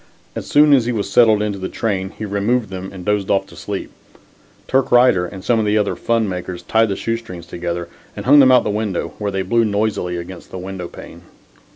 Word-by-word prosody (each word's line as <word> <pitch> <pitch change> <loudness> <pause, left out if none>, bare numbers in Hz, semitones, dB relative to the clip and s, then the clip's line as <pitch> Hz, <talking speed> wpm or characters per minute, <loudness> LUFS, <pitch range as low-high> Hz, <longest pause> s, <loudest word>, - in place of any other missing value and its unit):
As - - -5
soon 150 0 +5
as 130 -4 +4
he - - +1
was 105 -4 -2
settled 110 -1 +5
in 100 -2 -3
the 95 - -3
train 95 -4 -2
he 110 - -7
removed 105 +3 0
them 95 0 -6
and 95 -2 -9
dozed 105 -2 0
off 95 0 +2
to 85 - -16
sleep. 95 +4 -5 0.8
Turk 135 0 +1
Righter 120 -8 +5
and 95 +1 -10
some 120 -2 +2
of 110 - 0
the 105 +1 +2
other 105 -1 0
fun 115 -2 0
makers 90 -1 -5
tied 110 0 +2
the 100 - -1
shoe 115 +3 -2
strings 90 -7 -10
together, 85 0 -4 0.3
and - - -7
hung 145 +3 +7
them 130 -2 +7
out 125 - +6
of - - -9
the 105 - -1
window 100 -5 -2
where 105 -1 -1
they 95 -1 -2
blew 115 +5 +2
noisily 100 -4 -1
against 85 +1 -9
the - - -7
window 95 -1 -6
pane. - - -12
100 Hz, 235 wpm, -19 LUFS, 95-115 Hz, 0.8 s, hung